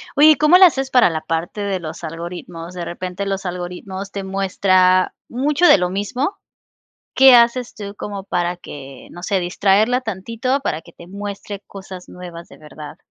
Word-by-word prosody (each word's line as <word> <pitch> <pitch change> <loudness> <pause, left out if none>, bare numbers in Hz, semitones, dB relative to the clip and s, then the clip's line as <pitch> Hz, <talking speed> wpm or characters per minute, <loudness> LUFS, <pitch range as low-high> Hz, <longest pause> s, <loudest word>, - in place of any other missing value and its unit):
Oye, 295 +2 +7
¿y 305 - +5
cómo 305 +5 +5
le 380 - +10
haces 270 -6 +1
para 250 -7 +5
la 160 -1 -3
parte 165 +6 -3
de 195 -2 -2
los 160 0 -8
algoritmos? 170 +1 -7
De 175 -1 -5
repente 180 +2 -5
los 195 -1 -3
algoritmos 180 +2 -6
te 200 -1 -5
muestra 185 -1 +2
mucho 290 +7 +1
de 345 - +7
lo 180 0 0
mismo, 225 - -2 0.8
¿qué 265 -1 +8
haces 235 +1 +3
tú 200 -1 -7
como 200 -1 -6
para 175 -2 -2
que, 135 -5 -11
no 175 - -10
sé, 195 0 0
distraerla 200 +7 +2
tantito 230 +5 -2
para 160 - -2
que 170 - -17
te 170 - -14
muestre 200 +1 -7
cosas 190 -2 -10
nuevas 175 -2 -10
de - - -16
verdad? 150 +1 -11
190 Hz, 180 wpm, -19 LUFS, 175-220 Hz, 0.8 s, le